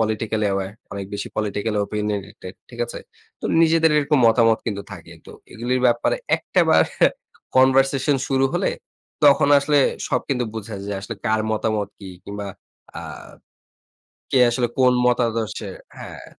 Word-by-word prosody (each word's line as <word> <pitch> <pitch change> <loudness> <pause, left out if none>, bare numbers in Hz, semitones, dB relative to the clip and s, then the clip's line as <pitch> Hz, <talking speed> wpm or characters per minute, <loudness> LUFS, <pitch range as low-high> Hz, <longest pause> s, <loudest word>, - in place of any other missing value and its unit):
politically 110 -1 -1
aware 95 0 -3 0.2
অনেক 100 -1 -5
বেশি 100 - -4
politically 105 0 -1
opinionated 105 -2 -5 0.2
ঠিক 120 -1 -9
আছে? - - -7 0.4
তো - - -9 0.2
নিজেদের 165 0 +4
এরকম 150 0 +2
মতামত 115 0 +4
কিন্তু 100 -3 -3
থাকে। 85 -3 -11
তো - - -11 0.2
এগুলির 125 +3 -1
ব্যাপারে 120 - +1 0.2
একটা - - 0
বার - - +6 0.7
conversation 135 +2 +4
শুরু 135 0 +2
হলে, - - +1 0.6
তখন 140 0 +5
আসলে 145 +1 +2 0.3
সব - - +1
কিন্তু 125 -3 0
বুঝা 110 -1 -6
যে 100 - -3
আসলে 110 +4 -6
কার 110 0 +2
মতামত 110 -1 -1
কি 95 - -10 0.2
কিংবা 100 0 -6 0.5
আ - - -6 1.3
কে 130 - +3
আসলে 120 +1 0
কোন 130 -1 +4
মতাদর্শের 115 -5 -1 0.2
হ্যাঁ। - - -9
115 Hz, 145 wpm, -22 LUFS, 105-130 Hz, 1.3 s, বার